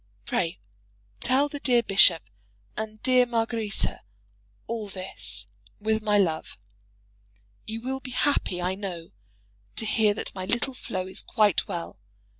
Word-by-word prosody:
Pray 165 -1 0 0.6
tell 270 +3 +4
the 290 0 -6
dear 245 -3 +3
bishop 195 -5 +6 0.5
and 215 0 -5
dear 255 -1 +5
Margaretta 225 -3 -1 0.6
all 225 -2 -3
this, 185 - -6 0.3
with 220 +1 +1
my 210 -1 +3
love. 165 -6 0 1.1
You 225 +1 -4
will 265 +2 -3
be 265 - -8
happy, 250 -8 +1
I 180 +1 0
know, 185 -4 -6 0.6
to 220 - -1
hear 210 -1 +3
that - - -4
my 185 -1 -4
little 240 +5 +1
Flo 195 -7 -4
is 185 - -3
quite 210 -4 +2
well. 170 - -5
215 Hz, 135 wpm, -27 LUFS, 185-235 Hz, 1.1 s, bishop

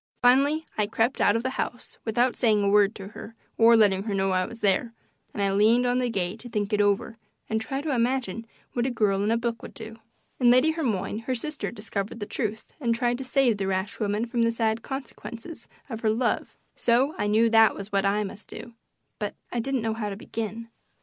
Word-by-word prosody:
Finally 280 +6 +4
I 210 - +2
crept 225 +4 0
out 205 - +4
of 230 - 0
the 260 - -1
house 245 - -6
without 240 +2 +1
saying 215 -4 +2
a 200 - +2
word 205 +1 +4
to 195 -1 -8
her 225 +1 -10 0.2
or 230 +1 +6
letting 200 -4 +4
her 205 -3 -1
know 195 0 +1
I 185 0 +1
was 230 - -11
there, 210 +4 +1 0.4
and 205 - -2
I 195 - +2
leaned 220 +5 +4
on 245 +1 +2
the 250 -1 0
gate 195 0 -2
to 245 - -10
think 210 -1 -2
it 210 - +3
over 205 +3 0 0.3
and 220 0 -1
try 270 +5 -3
to 300 -1 -2
imagine 235 -3 -1 0.3
what 240 +1 0
a - - +1
girl 205 -5 +1
in 210 - +1
a 230 - +3
book 235 0 -2
would - - -10
do. 225 0 -9 0.4
In 245 -2 +5
Lady 255 +6 +5
Hermione 230 - -2
her 260 - +1
sister 300 +5 -3
discovered 210 -1 -5
the 205 - -3
truth 220 0 -4
and 235 -3 +1
tried 240 +1 0
to - - -4
save 255 -3 +3
the 195 - -1
rash 190 +1 -2
woman 210 +2 0
from 235 0 -1
the 230 0 +3
sad 225 -1 0
consequences 265 +2 -7 0.2
of 225 -5 -5
her 220 - +1
love, 235 +3 -1 0.2
so 250 +5 +2
I 205 - +1
knew 220 +2 +4
that 225 -1 +6
was 200 +1 -8
what 195 -1 +2
I 205 +1 +1
must 205 +1 -8
do, 235 - -9 0.5
but 210 -1 -3 0.2
I 240 - -1
didn't 260 0 -1
know 225 -1 0
how 220 -2 -3
to 200 - -5
begin. 225 +1 -5
225 Hz, 230 wpm, -26 LUFS, 205-245 Hz, 0.5 s, or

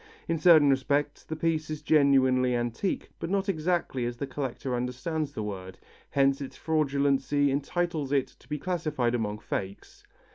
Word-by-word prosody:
In 165 -1 0
certain 155 -4 +7
respects 145 +2 0
the 160 - -5
piece 160 -1 -1
is 155 -1 -5
genuinely 130 -4 +4
antique, 120 - -2
but 165 - -4
not 195 +1 0
exactly 165 -7 0
as 120 0 -5
the 140 - -3
collector 135 -1 -4
understands 135 +5 -2
the 110 - -4
word, 95 -3 -6 0.3
hence 140 0 +2
its 135 - -7
fraudulency 145 -2 +1
entitles 150 +1 -1
it 140 -2 +2
to - - -22
be 150 - -2
classified 150 -8 -1
among 105 -3 -1
fakes. 100 -2 -6
140 Hz, 155 wpm, -28 LUFS, 130-155 Hz, 0.3 s, certain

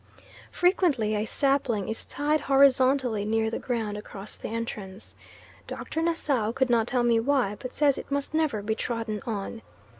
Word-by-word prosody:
Frequently 340 - +2
a 210 0 0
sapling 270 -6 0
is 220 - -5
tied 300 +1 0
horizontally 265 -4 +4
near 220 +1 0
the - - -3
ground 225 -5 -2
across 205 -1 -8
the - - -7
entrance. 215 -3 -6 0.5
Dr. 320 - -4
Nassau 290 -9 0
could 260 -1 +1
not 230 -1 +3
tell 245 -1 +1
me 235 -1 +4
why, 245 -4 +1
but 255 - -7
says 285 -2 +3
it - - -9
must 280 +1 -2
never 305 -10 0
be 220 +1 0
trodden 225 -2 -3
on. 220 +1 -4
235 Hz, 160 wpm, -27 LUFS, 215-280 Hz, 0.5 s, horizontally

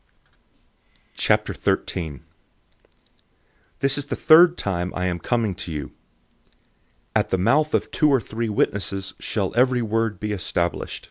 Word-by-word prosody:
013:001 80 -7 -1 1.6
This 135 +1 +2
is 145 - -6
the - - -2
third 170 +2 +6
time 90 -2 -2
I 90 - -1
am 90 -1 -1
coming 115 0 0
to 90 -1 -6
you. 75 -2 -5 1.2
"At - - +2
the 95 - +1
mouth 150 +11 +2
of - - -1
two 150 - +3
or 135 -2 +4
three 115 0 -4
witnesses 100 -1 -1
shall 100 -4 -2
every 125 0 +3
word 115 0 -1
established." 90 -4 -2
105 Hz, 125 wpm, -23 LUFS, 90-125 Hz, 1.6 s, third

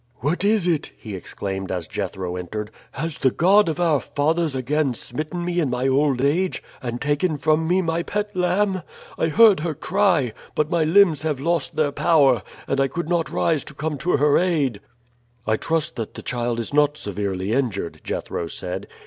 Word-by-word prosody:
"What 160 +7 0
is 205 -2 +3
it?" 165 -4 0
he 110 - -8
exclaimed 95 +1 -5
as 90 -3 -3
Jethro 90 +2 -4
entered. 105 +4 -5 0.2
"Has 160 +1 -4
the 130 - +4
God 190 +7 +4
of 160 - -3
our 165 -5 +3
fathers 155 +1 0
again 135 0 0
smitten 155 +9 -4
me 175 0 0
in 150 -6 +1
my 125 +1 0
old 135 -1 +2
age, 175 +7 +1 0.2
and 120 -1 -4
taken 150 +3 0
from 155 +2 +1
me 185 +2 +2
my 165 0 0
pet 205 +3 -3
lamb? 185 +1 +1 0.4
I 160 - +2
heard 210 +2 +6
her 155 -1 -2
cry, 180 - +1 0.2
but 150 +1 0
my 170 -2 +2
limbs 165 -2 +4
have 155 -4 -1
lost 165 +1 0
their 150 -2 +1
power, 140 - +3 0.3
and 135 - 0
I 135 - +3
could 170 +5 -4
not 170 -2 +1
rise 160 -4 +1
to 150 - -7
come 150 0 -3
to 180 - +1
her 145 +1 +4
aid." 150 - 0 0.7
"I 110 - +2
trust 160 0 -1
that 115 -2 -5
the - - -8
child 120 -1 -2
is 115 - -4
not 150 0 +3
severely 100 -1 -2
injured," 115 -10 -2
Jethro 85 - -3
said. 90 +3 -5
150 Hz, 190 wpm, -22 LUFS, 125-170 Hz, 0.7 s, heard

